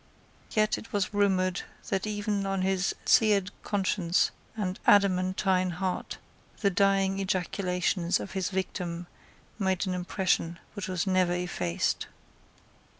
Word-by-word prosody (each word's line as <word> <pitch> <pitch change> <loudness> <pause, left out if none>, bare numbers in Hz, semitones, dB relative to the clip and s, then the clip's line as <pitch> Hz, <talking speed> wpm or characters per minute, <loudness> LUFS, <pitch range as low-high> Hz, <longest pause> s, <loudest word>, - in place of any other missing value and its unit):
Yet 215 -1 +2
it - - -13
was 200 -1 -1
rumoured 190 -3 +2 0.3
that 195 +1 -1
even 205 -1 -1
on 195 -1 0
his 190 0 +1
seared 205 -3 +4
conscience 190 -3 +1 0.3
and 190 -2 -2
adamantine 185 -1 +3
heart 185 +1 -3 0.4
the 200 -3 +3
dying 195 0 +2
ejaculations 180 -1 0
of - - -6
his 190 -2 -1
victim 180 -2 -3 0.5
made 190 -1 +1
an 185 - -1
impression 180 -2 0 0.2
which 205 -3 -5
was 185 +1 -1
never 185 -2 +2
effaced. 175 - -1
190 Hz, 120 wpm, -28 LUFS, 180-200 Hz, 0.5 s, seared